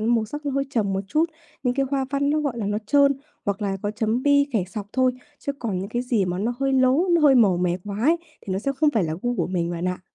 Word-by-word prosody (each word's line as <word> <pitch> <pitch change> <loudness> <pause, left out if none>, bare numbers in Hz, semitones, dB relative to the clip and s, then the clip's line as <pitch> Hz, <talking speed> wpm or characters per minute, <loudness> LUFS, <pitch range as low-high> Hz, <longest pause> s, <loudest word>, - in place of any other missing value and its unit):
màu 230 -2 +2
sắc 295 +6 -7
nó - - +1
hơi 275 0 0
trầm 210 -6 0
một 190 - 0
chút, 310 +2 +3 0.4
những 250 -1 +1
cái 275 0 +1
hoa 270 -1 +1
văn 280 0 +1
nó, 305 0 +2
gọi 265 -6 -2
là, 205 - -2
nó 205 +1 0
trơn 280 +3 +5 0.3
hoặc 200 +1 -2
là 195 -1 -1
có 205 - -1
chấm 220 +3 -1
bi, 285 0 +4
kẻ 200 -6 +1
sọc 205 +1 -6
thôi. 255 -1 +3 0.3
Chứ 280 - -3
còn 230 -9 -3
những 195 +2 -4
cái 240 +2 -2
gì 235 -6 +1
mà 180 0 -2
nó 235 +4 -1
hơi 270 0 +1
lố, 265 +7 +3
nó 340 -1 +4
hơi 285 -3 +6
màu 205 -7 +5
mè 180 0 0
quá 205 0 -5
ấy, 325 +5 +4 0.2
thì 190 - -5
nó 190 - 0
sẽ 275 +6 -1
không 305 0 +3
phải 215 -9 +1
là 155 - -2
gu 245 0 -1
của - - 0
mình 175 -2 -1
bạn 175 +1 -2
ạ. 180 - -3
240 Hz, 295 wpm, -24 LUFS, 200-280 Hz, 0.4 s, hơi